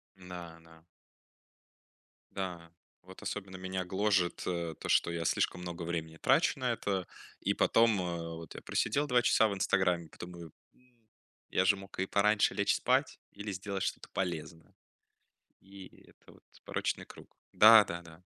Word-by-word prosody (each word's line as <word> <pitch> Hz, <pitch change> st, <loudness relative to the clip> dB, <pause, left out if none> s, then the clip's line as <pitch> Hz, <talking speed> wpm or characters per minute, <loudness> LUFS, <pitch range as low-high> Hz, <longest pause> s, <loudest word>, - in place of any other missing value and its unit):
Да, 90 Hz, -3 st, -9 dB
да. 80 Hz, -1 st, -19 dB, 1.5 s
Да. 90 Hz, -3 st, -5 dB, 0.3 s
Вот 95 Hz, +1 st, -14 dB
особенно 95 Hz, -2 st, -5 dB
меня 95 Hz, 0 st, -4 dB
гложет, 95 Hz, -1 st, +1 dB
э, 85 Hz, -3 st, -2 dB
то, -, -, -6 dB
что 85 Hz, -, +3 dB
я 85 Hz, -1 st, -3 dB
слишком 90 Hz, -, 0 dB
много 85 Hz, -1 st, -6 dB
времени 80 Hz, -1 st, -4 dB
трачу 135 Hz, -, +3 dB
на 125 Hz, -1 st, 0 dB
это, 95 Hz, -5 st, -2 dB, 0.3 s
и -, -, 0 dB
потом, 115 Hz, -4 st, +3 dB
э, 85 Hz, -2 st, -4 dB
вот 80 Hz, 0 st, -10 dB
я -, -, -8 dB
просидел 145 Hz, +1 st, 0 dB
2 125 Hz, -3 st, +3 dB
часа 110 Hz, -1 st, +4 dB
в 105 Hz, -, -2 dB
"Инстаграме", 90 Hz, -3 st, +1 dB
потом 90 Hz, +3 st, -9 dB
думаю, 85 Hz, -2 st, -10 dB, 0.2 s
м, 120 Hz, -3 st, -31 dB, 0.4 s
я 95 Hz, -, +2 dB
же 100 Hz, -, +5 dB
мог 95 Hz, -1 st, -11 dB
и 95 Hz, -, +1 dB
пораньше 105 Hz, +1 st, +3 dB
лечь -, -, +2 dB
спать, -, -, +1 dB
или 105 Hz, 0 st, -6 dB
сделать 95 Hz, 0 st, -4 dB
что-то -, -, -4 dB
полезное. 85 Hz, -3 st, -4 dB, 0.9 s
И 95 Hz, 0 st, -14 dB
это -, -, -20 dB
вот -, -, -21 dB, 0.2 s
порочный -, -, -2 dB
круг. -, -, -15 dB, 0.2 s
Да, 110 Hz, 0 st, +9 dB
да, 85 Hz, -1 st, -6 dB
да. 85 Hz, 0 st, -15 dB
95 Hz, 160 wpm, -32 LUFS, 85-100 Hz, 1.5 s, Да